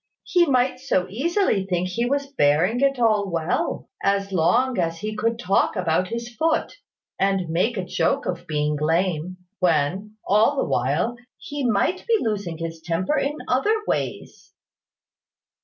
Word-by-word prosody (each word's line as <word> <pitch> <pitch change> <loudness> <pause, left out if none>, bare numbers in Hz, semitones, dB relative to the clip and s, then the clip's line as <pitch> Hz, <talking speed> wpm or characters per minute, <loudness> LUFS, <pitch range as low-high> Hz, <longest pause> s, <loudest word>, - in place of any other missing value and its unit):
He 350 -2 +3
might 255 -1 +2
so 220 -9 0
easily 285 - +1
think 180 -1 -1
he 235 +6 -1
was 280 +2 0
bearing 170 - +3
it 275 -1 +3
all 215 -4 +2
well, 165 0 -1
as 200 0 0
long 195 +8 +2
as 165 -1 0
he 215 0 -3
could 225 +2 0
talk 195 0 +1
about 180 -1 +1
his 235 +3 -6
foot, 320 +1 0 0.4
and 195 -3 +1
make 185 +8 0
a 185 - -2
joke 175 -2 0
of 180 - -4
being 150 -1 0
lame, 170 +2 0 0.2
when, 180 +4 0
all 215 +8 +3
the - - 0
while, 150 - 0 0.2
he 290 -1 -5
might 250 - 0
be 460 -1 +4
losing 200 - -2
his 165 0 -6
temper 180 - 0
in 285 +2 -2
other 270 - +2
ways." - - -4
195 Hz, 155 wpm, -23 LUFS, 170-245 Hz, 0.4 s, be